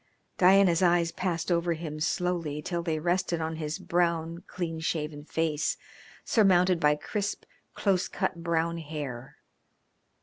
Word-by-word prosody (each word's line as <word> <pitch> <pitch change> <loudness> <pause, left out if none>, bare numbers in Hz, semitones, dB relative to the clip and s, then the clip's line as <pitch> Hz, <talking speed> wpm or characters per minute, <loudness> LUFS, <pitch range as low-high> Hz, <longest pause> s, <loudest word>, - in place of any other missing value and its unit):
Diana's 185 -2 +5
eyes 175 -2 +3
passed 175 -1 -2
over 170 0 +2
him 155 -2 -6
slowly 165 -2 -1
till 170 +1 -2
they 165 -2 -1
rested 175 +1 0
on 160 0 -3
his 155 0 -3
brown, 170 0 -1
clean 165 -3 -4
shaven 150 -2 -3
face, 160 -2 -1 0.5
surmounted 185 -4 +4
by 150 -1 +4
crisp, 200 +7 -3 0.3
close 190 -3 +1
cut 170 - -2
brown 170 0 0
hair. 145 -4 -6
170 Hz, 130 wpm, -28 LUFS, 155-175 Hz, 0.5 s, Diana's